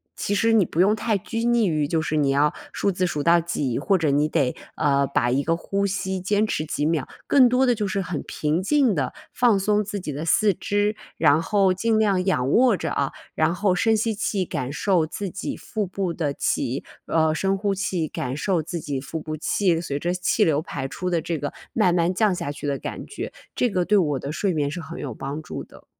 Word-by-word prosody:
其 205 - -1
实 225 +2 +3
你 220 -3 +5
不 165 - -4
用 200 +4 +5
太 220 -1 0
拘 230 +4 -4
泥 240 -3 +3
于 155 -4 0
就 160 0 0
是 155 0 -1
你 145 -2 +2
要 145 +2 +3 0.2
数 200 - 0
字 185 0 0
数 150 -4 -2
到 170 +1 +5
几， 145 -8 -2
或 190 +6 +2
者 155 -4 +1
你 145 +2 +2
得， 145 -5 0 0.2
呃， 140 -1 +2
把 120 0 +1
一 135 +3 +2
个 165 +2 +1
呼 200 +4 -1
吸 190 -1 -2
坚 205 +3 +1
持 155 - -1
几 150 -1 -2
秒。 155 -4 0 0.2
更 260 -3 +6
多 255 +2 +3
的 245 - +4
就 210 -3 -2
是 195 +1 -1
很 180 -5 -4
平 155 +4 -1
静 270 +1 +3
地 135 -7 -1 0.2
放 240 -5 +4
松 210 +2 +2
自 205 0 -4
己 155 - -5
的 145 +3 -4
四 205 +4 +3
肢， 205 +3 0 0.2
然 145 +3 +4
后 190 +1 +2
尽 220 +4 +1
量 200 -4 +2
仰 135 -9 +1
卧 245 +1 +5
着 160 -4 -3
啊， 140 -1 0 0.2
然 160 +2 +1
后 195 -1 +2
深 220 +5 +2
吸 225 +1 0
气 205 -2 -1
感 130 -3 -3
受 180 -2 +2
自 195 +4 -4
己 225 - -4
腹 210 -4 -4
部 190 -2 -2
的 150 -4 -2
气， 130 0 -1 0.2
呃， 160 -1 +2
深 195 +3 0
呼 200 0 0
气 180 -4 -2
感 130 +1 -4
受 175 +1 0
自 170 +2 -5
己 140 -3 -3
腹 155 +4 -6
部 155 0 -5
气 175 +1 +1
随 145 -4 -3
着 175 +3 -1
气 180 +4 +1
流 155 -5 +2
排 135 - -5
出 180 +5 -3
的 170 -2 +1
这 165 -2 -2
个 145 0 -4 0.2
慢 180 -1 +2
慢 170 +1 +2
降 200 -1 +2
下 145 - -3
去 145 - -6
的 140 -1 0
感 - - -6
觉， - - -6 0.2
这 245 - +2
个 185 -4 0
对 210 +2 +4
我 150 -7 +1
的 140 +3 -5
睡 195 +3 0
眠 145 -3 0
是 175 +4 -5
很 160 +1 -8
有 130 -5 -5
帮 140 +6 -5
助 - - -6
的。 - - -17
175 Hz, 255 characters per minute, -24 LUFS, 150-205 Hz, 0.2 s, 更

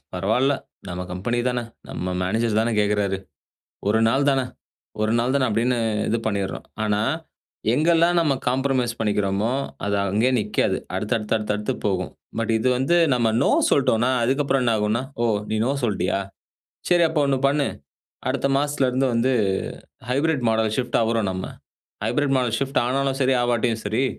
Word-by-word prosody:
பரவால்ல, 135 +3 +2 0.4
நம்ம 90 +1 -4
கம்பெனி 120 +7 -2
தானே, 125 -1 -1 0.3
நம்ம 90 0 -4
மேனேஜர் 110 +3 +1
தானே 115 +1 0
கேட்குறாரு. 100 -2 +1 0.7
1 110 +2 +3
நாள் 140 +4 +2
தானே, 135 -1 +1 0.6
1 110 +1 +1
நாள் 125 +3 +1
தானே 130 -2 +2
அப்படின்னு 120 +3 +1 0.3
இது 115 +2 +1
பண்ணீர்றோம். 100 -2 -2 0.2
ஆனா, 105 -1 +1 0.7
எங்கெல்லாம் 170 +2 +3
நம்ம 145 -4 +2
காம்ப்ரமைஸ் 130 -2 0
பண்ணிக்கிறோமோ, 105 0 0 0.4
அது 100 0 +1
அங்கேயே 115 +6 +2
நிக்காது. - - 0 0.2
அடுத்து 110 +3 0
அடுத்து 105 +1 -2
அடுத்து 105 -1 -1
அடுத்து 105 - -2
போகும். 95 -2 -1 0.3
பட் 115 0 0
இது 130 - +1
வந்து 140 +7 +2 0.2
நம்ம 120 -2 +2
நோ - - +3 0.2
சொல்ட்டோம்னா, 125 -3 +3
அதுக்கப்புறம் 135 +1 +1
என்ன 115 -2 +2
ஆகும்னா, 105 +4 0 0.2
ஓ, - - +3 0.2
நீ 110 - 0
நோ 135 - +1
சொல்ட்டியா? 100 -2 0 0.7
சரி, 175 -1 +5
அப்ப 160 -2 0
ஒண்ணு 135 -1 +1
பண்ணு. 145 0 +1 0.6
அடுத்த 140 - 0
மாசத்துல 145 -2 +1
இருந்து 130 +1 +1
வந்து 115 +3 +2 0.8
ஹைப்ரிட் 140 -1 +1
மாடல் 110 -1 +1
ஷிஃப்ட் 125 - 0
ஆவுறோம் 115 -2 +1
நம்ம. 95 0 -4 0.6
ஹைப்ரிட் 135 +5 +1
மாடல் 120 -3 0
ஷிஃப்ட் 135 0 0
ஆனாலும் 135 +1 0
சரி, 130 0 +3
ஆவாட்டியும் 120 -2 0
சரி, 110 +6 0
120 Hz, 155 wpm, -23 LUFS, 105-135 Hz, 0.8 s, சரி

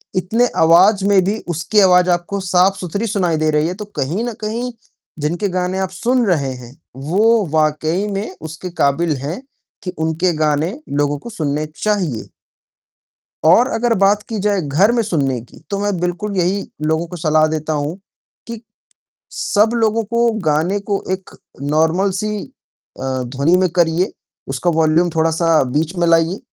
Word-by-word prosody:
इतने 220 +7 +2
आवाज़ 185 +5 +5
में 200 -2 +4
भी 205 +3 0
उसकी 170 +6 +1
आवाज़ 180 -1 +5
आपको 175 +3 -1
साफ-सुथरी 185 +3 +1
सुनाई 185 -6 0
दे 155 0 +1
रही 150 +1 +1
है 175 - -2
तो 210 +2 -7
कहीं 165 - -1
न 240 - -3
कहीं 230 +4 -3 0.5
जिनके 170 +7 -1
गाने 180 0 -2
आप 190 -1 -1
सुन 240 +7 +1
रहे 150 -9 +1
हैं, 125 0 -12 0.2
वो 205 +10 +2
वाक़ई 155 +5 +1
में 200 +2 -3
उसके 160 +3 -7
काबिल 150 +3 +2
हैं 145 - -5 0.4
कि 180 - -3
उनके 160 +3 0
गाने 155 - 0 0.2
लोगों 145 0 +1
को 235 - -9
सुनने 155 -7 -2
चाहिए। 185 - -2 1.2
और 205 +10 +6
अगर 230 +1 +1
बात 205 +1 +4
की 220 -2 -3
जाए 200 -1 +1
घर 160 +9 +2
में 240 -1 +1
सुनने 140 - 0
की, 120 - -17
तो 200 -1 -2
मैं 205 -1 0
बिल्कुल 180 +4 -2
यही 185 +3 +1 0.2
लोगों 160 +2 0
को 180 - -8
सलाह 155 -1 +3
देता 155 0 -2
हूँ 150 +2 -2 0.5
कि, 230 -2 -7 0.7
सब 210 +2 +1
लोगों 225 -1 +1
को 235 +2 +1
गाने 160 +6 +1
को 200 - 0
एक 190 0 -6 0.3
नॉर्मल 160 +7 +1
सी 210 +3 -2 0.6
अ, - - -8 0.2
ध्वनि 140 +7 +1
में 185 0 +2
करिए। 170 +1 +1 0.4
उसका 135 +6 0
वॉल्यूम 160 +2 +3
थोड़ा-सा 160 +1 +1 0.2
बीच 150 +7 -2
में 175 -1 +1
लाइए, 165 +3 +2
175 Hz, 165 wpm, -18 LUFS, 155-200 Hz, 1.2 s, और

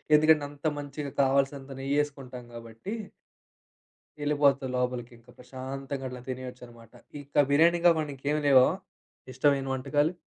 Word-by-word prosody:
ఎందుకంటే 155 -1 +5
అంత 145 +2 -15
మంచిగా 145 0 -6
కావాల్సినంత 135 0 +1
నెయ్యి 140 +2 0
వేసుకుంటాం 135 -4 -4
కాబట్టి. 115 - -8 1.3
యేళ్ళిపోతది 145 -2 +2
లోపలికి. 125 -1 -2
ఇంకా 115 +1 -19
ప్రశాంతంగా 135 +1 -6
అట్లా 125 -1 -8
తినేయొచ్చనమాట. 125 -3 -8 0.3
ఇంకా 145 +1 +2
బిర్యానీగా 170 +3 +5
మనకేం 145 0 -2
లేవా 130 -2 +7 0.7
ఇష్టమైన 135 +1 +2
వంటకాలు? 145 +5 0
140 Hz, 110 wpm, -28 LUFS, 130-145 Hz, 1.3 s, లేవా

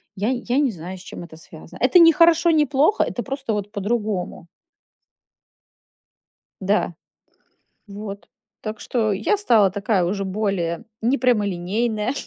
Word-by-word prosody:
я 205 +5 -1
я 250 +1 -1
не 275 -5 +2
знаю, 180 +1 -8
с - - -13
чем 175 - -9
это 160 -2 -12
связано. 160 0 -13
Это 255 +8 +4
ни 330 -1 +8
хорошо, 335 +1 +4
ни 305 -2 +3
плохо. 290 +9 +2
Это 240 - -4
просто 270 -4 -3
вот 205 0 -4
по-другому. 205 -4 -3 2.2
Да, 195 -2 0 0.9
вот. 200 0 -8 0.3
Так 215 -1 -6
что 220 -4 -1
я 215 - 0
стала 225 - +4
такая 200 -2 0
уже 195 +2 -2
более 190 -3 -2 0.2
непрямолинейная, 220 -2 0
215 Hz, 130 wpm, -22 LUFS, 195-255 Hz, 2.2 s, ни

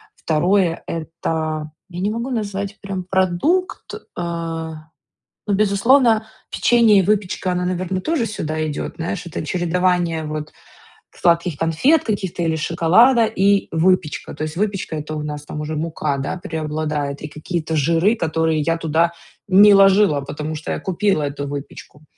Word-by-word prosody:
2 175 +2 +1
это, 160 -1 -3 0.2
я 175 -1 -7
не 200 - +1
могу 235 +4 -3
назвать 200 -3 -4
прям 195 -2 -4
продукт, 190 - 0
э, 165 - -5 0.8
ну 205 - +1
безусловно, 220 +3 +3 0.2
печенье 230 -4 +4
и - - +5
выпечка, 190 -1 0
она, 180 0 -1
наверно, 185 +1 -2
тоже 310 - 0
сюда 155 -6 -3
идёт, 150 - -4
знаешь, 170 +1 -4
это 170 - -5
чередование, 175 0 0
вот, 155 0 -5 0.6
сладких 170 -2 +1
конфет 165 - +2
каких-то 190 -5 -2
или 165 -1 0
шоколада 180 +10 +4
и 200 -1 +2
выпечка. 165 -1 0
То - - -6
есть, 155 +1 -6
выпечка, 195 -4 -2
это 150 0 -5
у 155 - -3
нас 150 -1 -6
там 150 - -5
уже 155 +1 -4
мука, 155 -2 -2
да, 135 +6 -3
преобладает 150 -4 -3
и 150 - -5
какие-то 160 +2 -4
жиры, 165 +8 +2
которые 160 -3 0
я 165 +2 +1
туда 165 +1 +1 0.4
не 200 +2 +7
ложила, 195 -5 +5
потому 150 +3 -5
что 155 - -5
я - - -3
купила 190 -2 0
эту 145 0 -3
выпечку. 145 +1 -8
170 Hz, 150 wpm, -20 LUFS, 155-195 Hz, 0.8 s, не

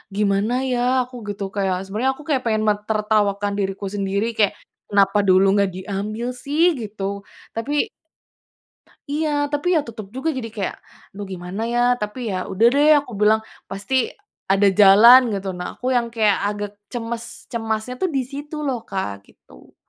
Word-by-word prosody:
"Gimana 205 +2 +1 0.2
ya 245 - 0 0.3
aku?" 250 0 -14
Gitu 205 0 -4
kayak 195 -2 0
sebenarnya 220 +7 0
aku 300 - -13
kayak 270 -4 +1
pengen 215 -1 +1
mentertawakan 210 -1 0
diriku 195 0 -2
sendiri 200 +1 -1
kayak, 210 -2 +3 0.4
"Kenapa 200 0 +3
dulu 185 +1 +5
enggak 200 -1 +2
diambil 205 +5 -4 0.2
sih?" 295 +3 -1 0.2
Gitu, 210 -3 -7 0.5
tapi 285 +6 -1 1.2
iya, 310 +1 0 0.2
tapi 290 +4 -1
ya - - +4
tutup 220 -3 -8
juga. 290 +5 -1
Jadi 235 -4 -5
kayak, 205 -3 -4 0.4
"Aduh, 205 +1 -6
gimana 185 +3 -6
ya 240 - +2 0.2
tapi 210 +4 -4
ya - - -1
udah 225 +5 +4
deh," 290 +2 +4
aku 265 -3 -10
bilang, 215 +1 +5 0.3
"pasti 235 +6 -1 0.4
ada 195 +1 +4
jalan," 230 +6 +8
gitu. 195 -1 -3
Nah, 180 0 -6
aku 255 +1 -1
yang 240 -1 +1
kayak 215 -4 +2
agak 205 -1 -4 0.2
cemes 235 -1 -6
cemasnya 225 +1 -2
tuh 375 - +1
di 275 -4 0
situ 290 +4 -8
loh, 250 -4 -1
Kak, 100 - -5
gitu. 60 - -20
215 Hz, 160 wpm, -21 LUFS, 200-245 Hz, 1.2 s, jalan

